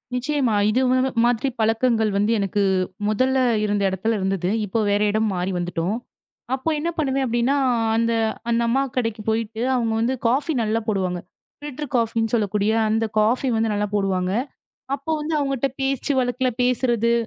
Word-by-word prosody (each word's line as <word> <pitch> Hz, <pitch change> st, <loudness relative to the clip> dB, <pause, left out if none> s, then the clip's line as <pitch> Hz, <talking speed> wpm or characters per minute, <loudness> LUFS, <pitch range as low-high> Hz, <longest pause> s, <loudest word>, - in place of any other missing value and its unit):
நிச்சயமா 260 Hz, -2 st, 0 dB, 0.2 s
இது 250 Hz, +5 st, +2 dB
ம 255 Hz, -, +3 dB, 0.3 s
மாதிரிப் 245 Hz, +2 st, 0 dB
பழக்கங்கள் 225 Hz, -1 st, +2 dB
வந்து 210 Hz, +3 st, +2 dB
எனக்கு 200 Hz, +1 st, 0 dB, 0.5 s
முதல்ல 255 Hz, +5 st, +1 dB, 0.3 s
இருந்த 205 Hz, -1 st, 0 dB
இடத்துல 220 Hz, +4 st, -1 dB
இருந்தது, 190 Hz, -1 st, -1 dB, 0.2 s
இப்போ 205 Hz, +3 st, -1 dB
வேற 205 Hz, +1 st, +2 dB
இடம் 215 Hz, +1 st, +1 dB
மாறி 180 Hz, +2 st, -1 dB
வந்துட்டோம். 175 Hz, +3 st, -2 dB, 0.6 s
அப்போ 265 Hz, +5 st, -3 dB
என்ன 335 Hz, +3 st, -1 dB
பண்ணுவேன் 270 Hz, -3 st, 0 dB
அப்படின்னா 240 Hz, +4 st, +1 dB, 0.4 s
அந்த 230 Hz, 0 st, +1 dB, 0.4 s
அந்த 235 Hz, 0 st, +2 dB
அம்மா 265 Hz, +4 st, +2 dB, 0.2 s
கடைக்குப் 225 Hz, -3 st, -2 dB
போயிட்டு 225 Hz, 0 st, -2 dB
அவங்க 230 Hz, -3 st, 0 dB
வந்து 235 Hz, +3 st, +1 dB
காஃபி 290 Hz, +6 st, +1 dB
நல்லா 220 Hz, +1 st, 0 dB
போடுவாங்க. 185 Hz, -4 st, -1 dB, 0.4 s
ஃபில்டர் 295 Hz, -1 st, -6 dB
காஃபின்னு 225 Hz, -1 st, 0 dB
சொல்லக்கூடிய 210 Hz, -1 st, +1 dB, 0.2 s
அந்த 225 Hz, +1 st, +1 dB
காஃபி 235 Hz, +5 st, +2 dB
வந்து 220 Hz, -1 st, +1 dB
நல்லா 205 Hz, 0 st, 0 dB
போடுவாங்க. 190 Hz, -2 st, 0 dB, 0.6 s
அப்போ 285 Hz, +3 st, -5 dB
வந்து 315 Hz, +1 st, -3 dB
அவங்க 275 Hz, -1 st, 0 dB
கிட்ட 275 Hz, +3 st, 0 dB
பேச்சு 270 Hz, +1 st, -1 dB
வழக்குல 250 Hz, 0 st, 0 dB
பேசுறது, 240 Hz, -2 st, +2 dB
230 Hz, 155 wpm, -22 LUFS, 210-255 Hz, 0.6 s, ம